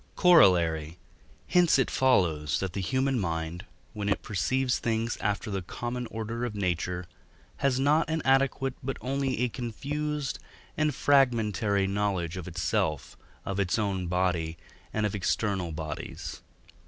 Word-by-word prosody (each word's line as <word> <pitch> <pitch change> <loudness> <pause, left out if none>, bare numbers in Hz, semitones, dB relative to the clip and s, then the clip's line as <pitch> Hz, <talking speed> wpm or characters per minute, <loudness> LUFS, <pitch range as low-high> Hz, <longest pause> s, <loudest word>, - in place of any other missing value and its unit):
Corollary. 85 - +5 0.5
Hence 175 -4 +4
it 135 - +1
follows 85 - +2
that 95 -3 -3
the 100 - -2
human 130 +5 +1
mind, 80 -2 -3 0.3
when 105 -1 -2
it 100 - 0
perceives 125 +6 0
things 115 0 -1
after 105 +1 -1
the 95 -1 -2
common 120 +6 -4
order 115 +2 -4
of 120 -3 -3
nature, 90 -2 -1 0.5
has 135 -2 +1
not 150 +4 +3
an 160 -1 -1
adequate 135 0 +2
but 135 +1 -3
only 135 0 -1
a 125 - +3
confused 140 +5 -3 0.4
and 150 -3 +1
fragmentary 110 -8 +3
knowledge 95 -4 -1
of 90 -2 -6
itself, 80 -4 -1 0.3
of 100 0 -2
its 95 0 +1
own 95 -4 -1
body, 85 -2 0 0.3
and 110 -1 0
of 105 - -1
external 95 -2 -1
bodies. 80 -1 -6
105 Hz, 140 wpm, -28 LUFS, 90-130 Hz, 0.5 s, Corollary